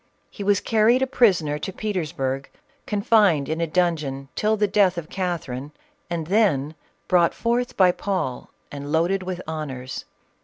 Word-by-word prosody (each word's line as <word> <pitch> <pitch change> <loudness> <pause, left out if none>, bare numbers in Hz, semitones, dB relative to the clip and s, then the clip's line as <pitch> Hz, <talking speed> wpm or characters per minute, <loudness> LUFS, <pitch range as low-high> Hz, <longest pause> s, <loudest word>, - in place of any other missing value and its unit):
He 205 - -7
was 200 0 +3
carried 230 +3 +3
a - - +3
prisoner 185 - +2
to 190 - -4
Petersburg, 155 -10 -3 0.4
confined 200 -8 +3
in 160 +2 -2
a 165 - +1
dungeon 155 -6 -1
till 215 +1 +1
the 210 0 +2
death 195 -3 +3
of 160 -2 -6
Catherine, 150 -7 -3 0.4
and 170 -2 -2
then 160 -7 +2 0.3
brought 175 -2 +3
forth 240 +1 -1
by 185 -2 +6
Paul 180 -10 -3 0.2
and 145 0 -6
loaded 175 +5 +2
with 185 -1 -5
honors. 135 -5 -5
175 Hz, 150 wpm, -23 LUFS, 150-205 Hz, 0.4 s, by